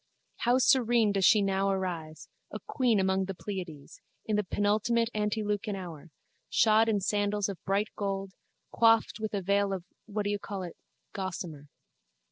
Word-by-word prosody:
How 245 +1 +2
serene 240 -4 +4
does 195 -2 +2
she 215 -2 +6
now 195 0 +1
arise, 170 -5 -3 0.2
a - - -4
queen 245 -6 +2
among 190 0 +1
the 195 0 -5
Pleiades, 175 -8 -7 0.2
in 215 - 0
the 210 - +1
penultimate 215 +4 +1
antelucan 210 -1 -1
hour, 170 -4 -8 0.4
shod 220 0 +4
in 205 -2 +1
sandals 205 0 0
of 195 -3 -7
bright 200 +3 +1
gold, 195 -1 -3 0.4
coifed 225 -1 +3
with 215 -1 -3
a 195 - -2
veil 200 +1 +2
of 190 -3 -3 0.2
what 210 0 -2
do 205 - -1
you 205 - -1
call 195 -1 -5
it 175 - -7 0.4
gossamer. 175 -6 -5
200 Hz, 160 wpm, -29 LUFS, 190-215 Hz, 0.4 s, she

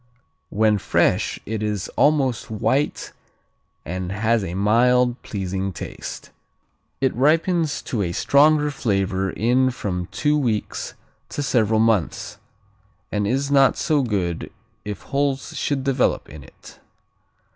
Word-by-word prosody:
When 105 0 +2
fresh - - +1
it 110 0 -3
is 105 -3 -2
almost 135 -6 +1
white 130 +7 -1 0.7
and 90 +2 -4
has 110 +2 +1
a 90 -1 -4
mild, 120 +5 +3
pleasing 95 -1 -3
taste. 85 - -8 0.7
It 130 - +2
ripens 160 +4 +2
to 115 - -2
a 90 -3 -1
stronger 150 - +3
flavor 95 -6 -1
in 125 +7 +2
from 90 -7 -4
two 150 0 0
weeks 115 -6 -2 0.3
to 145 - -3
several 110 -4 +2
months, 110 -5 0 0.7
and 105 -1 0
is 135 +5 0
not 135 -2 +5
so 155 -3 +1
good 95 -9 -2 0.3
if 105 -2 -6
holes 140 -1 -1
should 140 -2 -1
develop 135 -2 +1
in 75 -2 -10
it. - - -16
115 Hz, 125 wpm, -22 LUFS, 100-135 Hz, 0.7 s, not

